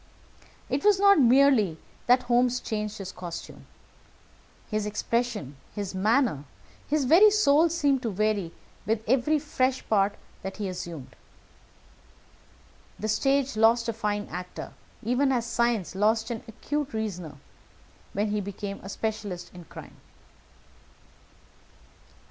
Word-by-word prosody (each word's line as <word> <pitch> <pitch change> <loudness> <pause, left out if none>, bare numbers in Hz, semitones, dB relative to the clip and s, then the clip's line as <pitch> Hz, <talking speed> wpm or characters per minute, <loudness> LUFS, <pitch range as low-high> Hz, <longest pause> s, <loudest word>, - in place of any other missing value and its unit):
It - - -2
was 410 -2 +5
not 400 -3 +6
merely 250 - +4 0.3
that 250 +1 +5
Holmes 245 0 +2
changed 210 -1 -4
his 195 -1 -6
costume. 175 -3 -8 1.0
His 215 -1 -2
expression, 210 - -2 0.2
his 200 -3 -4
manner, 210 - +1 0.4
his 295 -2 +1
very 355 +11 +7
soul 330 -6 +4
seemed 285 -5 +1
to 235 - -2
vary 205 -3 0 0.4
with 220 0 -1
every 265 +6 +3
fresh 265 -3 -1
part 205 -1 +2 0.3
that 190 0 -6
he 205 -2 -3
assumed. 175 -6 -7 1.8
The 215 - -3
stage 275 +4 +1
lost 230 +2 +3
a - - -1
fine 210 -2 -2
actor, 180 +2 -7 0.3
even 250 +5 +2
as 240 -3 0
science 235 -6 0
lost 220 +3 +1
an 230 - -4
acute 290 +5 -4
reasoner, 180 -8 -4 0.8
when 205 +2 0
he 210 0 -1
became 200 0 -6
a 195 - -9
specialist 210 -4 -4
in 175 -2 -11
crime. - - -12
220 Hz, 125 wpm, -27 LUFS, 200-260 Hz, 1.8 s, very